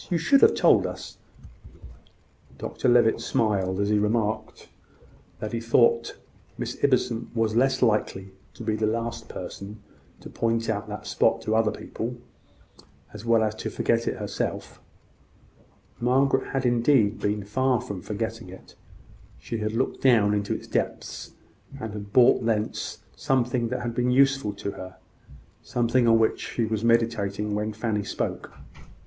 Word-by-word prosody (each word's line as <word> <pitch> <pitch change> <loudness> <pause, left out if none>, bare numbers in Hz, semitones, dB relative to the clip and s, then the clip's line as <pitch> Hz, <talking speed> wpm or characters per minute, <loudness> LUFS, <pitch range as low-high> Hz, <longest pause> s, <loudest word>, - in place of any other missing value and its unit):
You 175 - +1
should 275 - +4
have - - +6
told - - +4
us." - - -8 1.4
Dr 130 - -2
Levitt 120 -2 +4
smiled 95 -4 0
as 100 0 0
he 105 0 +3
remarked 110 0 -1 0.7
that 110 +2 -6
he 115 - -1
thought 115 0 +2 0.4
Miss - - -4
Ibbotson 115 0 +1
was 115 -1 +1
likely 115 -7 +1 0.2
to - - -9
be 110 -1 0
the 110 0 0
last 115 +1 -3
person 100 +3 -8 0.4
to - - -9
point 115 -1 -1
out 105 -1 -4
that - - -7
spot - - +1
to 110 - 0
other 110 -1 +3
people, 120 +3 -5 1.0
as 105 +1 -9
well 115 -1 +4
as 110 -1 0
to 110 - -5
forget 115 0 0
it - - -1
herself. - - -4 1.2
Margaret 135 +2 +2
had 135 -1 0
indeed 120 -3 +3
been 105 0 -1
far 130 +4 +1
from 100 -4 -6
forgetting 115 0 -5
it. 95 - -13 0.6
She 115 - -5
had 110 0 -2
looked 125 +3 -1
down 110 -6 +4
into 100 -1 -1
its - - -7
depths, - - -3 0.5
and 110 -4 -5
had 100 -1 -8
brought 125 +1 +5
thence 110 -2 -2
something 125 -2 0
that 125 +1 -3
had 120 -1 -3
been 125 +1 0
useful 135 -4 +3
to 100 0 -5
her 95 -1 -10 0.6
something 120 0 +1
on 115 0 +6
which 110 -1 +1
she 115 - +1
was 110 0 -2
meditating 110 -3 +1
when 105 +1 -1
Fanny 110 -1 -2
spoke. - - -4
115 Hz, 150 wpm, -25 LUFS, 105-120 Hz, 1.4 s, have